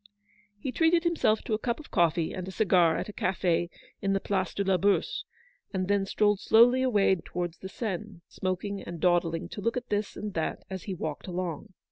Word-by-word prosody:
He 255 +6 -4
treated 330 +3 +3
himself 330 -11 +2
to - - -3
a 215 - +1
cup 235 +3 -2
of 305 - -12
coffee 170 -1 +2
and 185 -1 -5
a - - -5
cigar 180 -5 +3
at - - -3
a 210 - -8
cafe 175 -3 0 0.3
in 195 0 +1
the 195 - +2
Place 190 -2 -1
de 200 - 0
la 190 -1 +2
Bourse, 200 +3 +1 0.5
and 185 -1 0
then 200 -1 +1
strolled 205 0 +2
slowly 245 +5 +5
away 210 -7 +3
towards 175 -1 -4
the 190 - -7
Seine, 210 -3 -5
smoking, 195 +2 -3
and 170 -1 -7
dawdling 170 -1 +1
to 205 - -7
look 230 +4 0
at 250 - -5
this 205 0 -1
and 210 -1 -5
that 160 - -2
as 190 -2 -5
he 195 - -3
walked 155 -1 -5
along. 180 -2 -4
195 Hz, 205 wpm, -28 LUFS, 175-215 Hz, 0.5 s, slowly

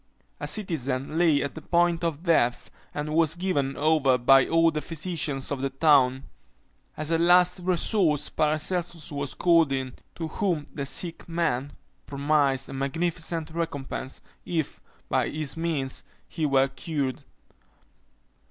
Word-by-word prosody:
A - - -4
citizen 150 - -1
lay 160 -5 +3
at 140 - -4
the 160 - -9
point 170 +1 +1
of 165 -1 -2
death, 140 -9 +1 0.2
and 150 +1 -4
was 160 0 +3
given 160 -7 -1
over 145 -4 +3
by 135 +2 +5
all 165 0 +3
the 155 -1 -3
physicians 155 -5 -2
of 140 -2 -2
the 135 - 0
town. 135 -2 +3 0.7
As 155 +1 0
a 165 - +2
last 180 +2 +4
resource 175 -3 +1
Paracelsus 155 +2 -1
was 140 -1 -4
called 165 -4 +3
in, 130 -2 -2 0.2
to 165 - -4
whom 165 -3 -1
the 140 -2 -3
sick 170 +3 0
man 145 -5 -1 0.3
promised 140 -2 +1
a - - -9
magnificent 165 +3 -2
recompense, 140 -5 -4 0.2
if, 160 -4 -3 0.3
by - - 0
his 150 -2 -3
means, 160 -5 -2 0.2
he 160 -3 -2
were 135 -1 +3
cured. 135 -2 -3
155 Hz, 140 wpm, -26 LUFS, 135-170 Hz, 0.7 s, by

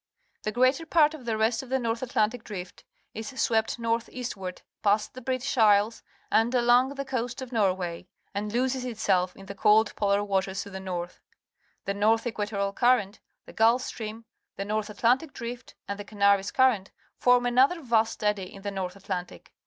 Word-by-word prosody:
The 215 - -2
greater 255 +8 +2
part 315 -2 +4
of 290 -6 -10
the 225 -2 -1
rest 225 +1 +1
of 265 - -12
the 265 - +2
Nor 230 -3 0
th 230 - -13
Atlantic 220 +1 0
Drift 185 -4 -8 0.3
is 240 +5 -7
swept 220 0 +1
north 230 0 -1
eastward 195 -7 -6 0.2
past 210 +1 +1
the 255 - -9
British 260 +2 -2
Isle 210 -1 +5
s 230 - -16 0.3
and 225 +3 +3
a 245 - +4
long 250 +3 +4
thp 275 0 -4
pnnst, 255 0 -3
_of 250 - -18
..Norway 185 -5 -1 0.3
and 205 +1 -3
loses 255 +2 0
itself 200 -7 0
in 195 - -12
the 200 - -7
cold 210 +2 +3
polar 200 0 +1
waters 195 -1 -1
to 200 - -11
the 190 - -6
north. 180 -2 -5 0.6
The 200 - -1
North 220 +3 +2
Equatorial 205 -3 -2
Current, 235 -3 +2 0.3
the - - -13
Gulf 230 +3 +4
Stream, 225 -1 -6 0.3
the 195 - -4
North 215 +1 -2
Atlantic 245 +8 +1
Drift, 235 +1 -7
and 200 0 -4
the - - -4
Canaries 200 -1 +2
Current 250 -8 +2 0.3
form 245 0 +4
another 260 +8 +4
vast 225 -6 0
eddy 205 -3 0
in_ 195 - -12
the 205 - -3
North 190 -2 -4
Atlantic. 190 -2 -6
220 Hz, 190 wpm, -27 LUFS, 200-245 Hz, 0.6 s, Isle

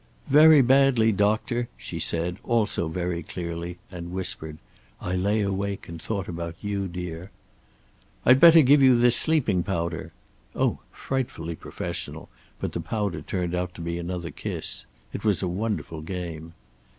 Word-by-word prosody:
"Very 150 0 +8
badly, 130 -3 +4
doctor," 110 +4 0
she - - -7
said, 85 +2 0
also 110 -7 0
very 85 +1 -3
clearly, 85 +1 -5
and 85 -1 -7
whispered, 80 -4 -3 0.4
"I 90 - -4
lay 100 +4 +1
awake 100 0 -2
and 85 -1 -8
thought 100 -4 -3
about 85 -1 -5
you, 100 -1 -2
dear." 90 0 -6 1.0
"I'd 130 +2 +7
better 165 +1 +9
give 140 +2 +6
you 130 -2 +7
this 120 0 +5
sleeping 125 - +3
powder." 85 -2 -3 0.4
Oh, - - +1
frightfully 120 -11 -4
professional, - - -6 0.3
but - - -3
the - - -4
powder 105 -5 -2
turned 90 -2 -3
out 90 0 -2
to - - -8
be 85 +1 -3
another 85 -1 -4
kiss. - - -5 0.3
It - - -5
was 105 -3 +2
a - - 0
wonderful 90 -4 -3
game. 85 -1 -6
95 Hz, 150 wpm, -25 LUFS, 85-115 Hz, 1.0 s, better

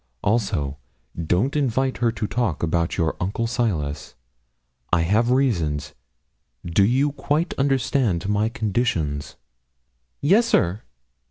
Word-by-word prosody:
Also, 85 - 0 0.5
don't 110 - +1
invite 130 -2 0
her 120 -2 +2
to 110 - -3
talk 105 -6 -1
about 85 0 0
your 80 -2 0
uncle 100 +5 -1
Silas 85 - -2 0.8
I 85 - +3
have 105 +8 +2
reasons. 90 - 0 0.7
Do 85 +3 +3
you 130 +7 +2
quite 150 +4 -1
understand 130 - +1
my 105 +2 +1
conditions?' 95 -11 -1 0.8
'Yes, 205 +11 +4
sir.' 105 - +2
110 Hz, 110 wpm, -23 LUFS, 85-130 Hz, 0.8 s, Yes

